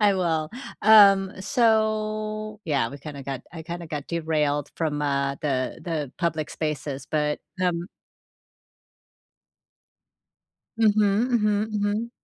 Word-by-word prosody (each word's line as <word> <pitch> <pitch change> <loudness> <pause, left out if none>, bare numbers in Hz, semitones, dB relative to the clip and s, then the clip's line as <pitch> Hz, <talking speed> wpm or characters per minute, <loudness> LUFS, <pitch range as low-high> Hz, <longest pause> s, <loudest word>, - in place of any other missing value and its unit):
I 205 -1 +5
will, 160 -4 0 0.3
um, 200 -3 +7
so, 215 -1 0
yeah, 140 -7 +1
we 140 - -9
kind 145 +1 -8
of 140 - -8
got 135 -2 -4
I 165 -2 -7
kind 170 +1 -6
of 165 - -9
got 150 -3 -5
derailed 150 -3 -1
from, 150 -3 -1
uh, 140 -1 0
the 130 -4 -2
the 155 -6 -3
public 160 -3 -1
spaces, 145 -3 -4
but 150 -1 0 0.2
hum 175 -2 0 2.9
Mhm, 215 -2 +4 0.3
mhm, 210 -2 +2
mhm. 210 +2 -1
170 Hz, 125 wpm, -25 LUFS, 150-210 Hz, 2.9 s, um